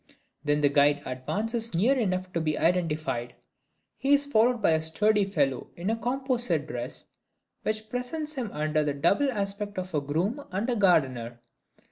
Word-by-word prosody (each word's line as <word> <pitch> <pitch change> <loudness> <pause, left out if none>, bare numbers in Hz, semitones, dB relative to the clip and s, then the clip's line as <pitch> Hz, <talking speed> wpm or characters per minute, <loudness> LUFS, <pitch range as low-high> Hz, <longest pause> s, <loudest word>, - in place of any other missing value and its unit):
Then 145 0 +1
the 145 - +4
guide 145 0 +3
advances 220 - -2
near 230 +11 +3
enough 185 -6 -1
to 170 - 0
be 155 -1 0
identified. 155 -8 0 0.6
He 275 +2 +4
is 285 0 0
followed 240 -2 +3
by 200 - +3
a 160 0 +2
sturdy 210 +6 +2
fellow 140 -9 0
in 180 +5 -2
a - - +1
composite 240 - -1
dress, 125 -5 -6 0.6
which 215 0 -1
presents 250 +7 -3
him 255 -7 -3
under 155 0 0
the 145 -1 -1
double 200 - +2
aspect 205 -1 -3
of 185 -1 -4
a 150 - +1
groom 175 - -1
and 195 +6 -2
a - - +1
gardener. 130 - +2
185 Hz, 165 wpm, -27 LUFS, 150-230 Hz, 0.6 s, the